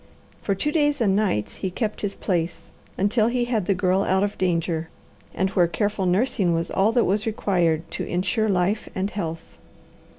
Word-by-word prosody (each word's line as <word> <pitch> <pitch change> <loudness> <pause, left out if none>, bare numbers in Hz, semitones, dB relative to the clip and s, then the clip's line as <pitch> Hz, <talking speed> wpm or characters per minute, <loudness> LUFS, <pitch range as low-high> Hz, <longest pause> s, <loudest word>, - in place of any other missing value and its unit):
For 200 - 0
two 295 +10 0
days 295 -2 +2
and 200 -5 +2
nights 105 - 0
he 190 - -2
kept 215 +3 -3
his 205 -1 -2
place, 170 -2 -2 0.3
until 215 +3 +2
he 240 0 0
had 225 -6 -1
the 195 - +3
Girl 185 0 +2
out 190 0 +2
of 205 0 -1
danger, 165 -2 -1 0.4
and 190 +2 -1
where 180 -3 +3
careful 205 +1 -1
nursing 185 -2 +2
was 165 0 -2
all 200 +3 +3
that 240 - +3
was 205 +4 0
required 175 -7 +1
to - - -3
insure 190 +5 0
life 195 +3 0
and 190 +2 -1
health. 165 -5 -6
195 Hz, 185 wpm, -24 LUFS, 175-215 Hz, 0.4 s, the